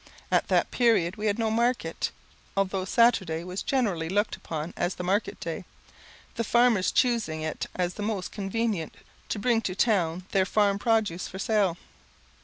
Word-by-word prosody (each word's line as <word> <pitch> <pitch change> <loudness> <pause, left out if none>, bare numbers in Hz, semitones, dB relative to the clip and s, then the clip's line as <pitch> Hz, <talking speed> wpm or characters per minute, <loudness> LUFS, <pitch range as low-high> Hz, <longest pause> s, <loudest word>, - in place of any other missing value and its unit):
At - - +3
that - - +2
period 220 -7 +3
we 215 0 -2
had 205 0 +1
no 225 -1 0
market, 235 +2 0 0.5
although 195 -1 0
Saturday 190 -7 +3
was 180 +2 -5
generally 195 -12 0
looked 205 +3 +1
upon 160 +1 -5
as 175 +2 -1
the 180 - -5
market 195 +4 0
day; - - -4 0.7
the 230 - -2
farmers 235 -4 +3
choosing 220 -11 +1
it 155 - -3
as 180 -1 -1
the 210 - -7
most 205 -3 -2
convenient 200 -4 -2 0.3
to - - -1
bring 225 +2 +2
to 185 -4 -3
town 185 -5 +1
their 190 -1 +2
farm 200 -1 +2
produce 215 -6 +1
for 190 - -8
sale. 195 -4 +1
200 Hz, 165 wpm, -27 LUFS, 180-225 Hz, 0.7 s, At